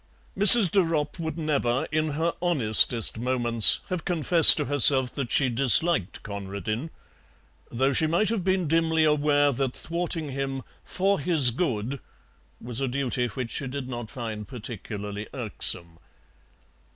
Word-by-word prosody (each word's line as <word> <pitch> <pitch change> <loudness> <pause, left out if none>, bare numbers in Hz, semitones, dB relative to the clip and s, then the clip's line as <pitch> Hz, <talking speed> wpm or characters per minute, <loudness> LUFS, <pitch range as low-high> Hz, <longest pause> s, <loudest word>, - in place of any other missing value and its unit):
Mrs. 205 -2 +9
de 200 - +1
Ropp 165 -2 -4
would 160 0 -7
never, 140 -6 -3
in 155 -1 -3
her 165 +1 -3
honestest 115 - +1
moments, 120 -2 +3
have 180 -3 -6
confessed 170 -2 +6
to - - -3
herself 135 -2 +4
that 135 -4 -7
she 145 -5 +1
disliked 125 - +1
Conradin, 100 - -8 0.8
though 135 +3 -2
she 160 - -1
might 175 +6 -1
have 220 -5 -4
been 185 -2 -2
dimly 160 0 -1
aware 145 -1 0
that 130 -1 -5
thwarting 170 -2 -5
him 135 -1 -6 0.2
"for 195 +2 -3
his 145 -5 +2
good" 130 - -5 0.6
was 120 +2 -6
a 135 - -3
duty 125 -1 -4
which 120 +1 -8
she 135 - -2
did 130 0 -8
not 120 -3 -9
find 110 -5 -9
particularly 105 -3 -9
irksome. 85 -8 -5
135 Hz, 140 wpm, -23 LUFS, 120-160 Hz, 0.8 s, Mrs